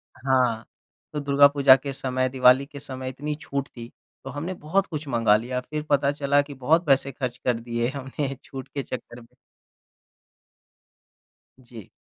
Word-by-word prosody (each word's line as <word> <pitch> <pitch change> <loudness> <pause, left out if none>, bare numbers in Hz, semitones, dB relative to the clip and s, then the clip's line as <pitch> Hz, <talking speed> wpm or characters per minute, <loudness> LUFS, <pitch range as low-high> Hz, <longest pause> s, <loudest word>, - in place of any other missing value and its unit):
हाँ, 125 -4 +1 0.5
तो 150 - -2
दुर्गा 140 0 +5
पूजा 140 -2 +6
के 135 +1 -5
समय, 130 -1 -1
दिवाली 130 +1 +5
के 145 0 -11
समय 130 -1 -6
इतनी 150 +3 -4
छूट 140 0 -3
थी 115 -1 -11 0.3
तो 135 - -7
हमने 155 +7 -4
बहुत 185 +4 0
कुछ 155 -2 -6
मँगा 115 -5 +3
लिया, 125 +3 -3
फिर 150 +4 -5
पता 140 -1 +3
चला 145 0 +2
कि 145 0 -9
बहुत 155 +6 +2
पैसे 140 -1 +2
खर्च 125 -1 -4
कर 125 -2 -1
दिए 120 0 -2
हमने 135 +1 -4
छूट 135 -1 -8
के 140 - -5
चक्कर 120 -2 -8
में। 115 - -17 2.4
जी। 115 -4 -12
135 Hz, 165 wpm, -25 LUFS, 125-145 Hz, 2.4 s, पूजा